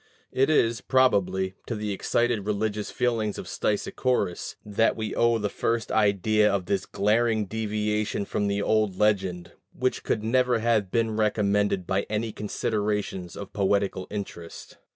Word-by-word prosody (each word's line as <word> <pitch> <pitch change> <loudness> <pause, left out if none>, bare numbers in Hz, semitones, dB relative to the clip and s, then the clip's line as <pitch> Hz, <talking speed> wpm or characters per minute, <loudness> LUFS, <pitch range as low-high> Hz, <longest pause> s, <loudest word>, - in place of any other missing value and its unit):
It 135 +2 +2
is, 120 -7 +2
probably, 95 -7 +2
to 120 - -2
the 105 -1 -3
excited 115 +1 0
religious 105 0 -1
feelings 115 -4 -1
of - - -6
Stesichorus 105 -2 -1
that 105 +2 +2
we 110 -1 -3
owe 115 0 +3
the 105 -2 -1
first 115 +2 -1
idea 105 0 +3
of 100 -2 -1
this 95 0 -1
glaring 110 +1 +1
deviation 105 -1 -1
from 105 0 -1
the 100 0 0
old 110 -3 +1
legend, 95 -4 0 0.3
which 130 0 0
could 110 - -1
never 125 +1 +2
have 110 -4 +1
been 115 +1 0
recommended 105 -3 +1
by 95 +2 -1
any 110 +1 -1
considerations 105 -3 -2
of 100 - -8
poetical 100 -1 0
interest. 95 -5 -7
105 Hz, 145 wpm, -26 LUFS, 100-110 Hz, 0.3 s, owe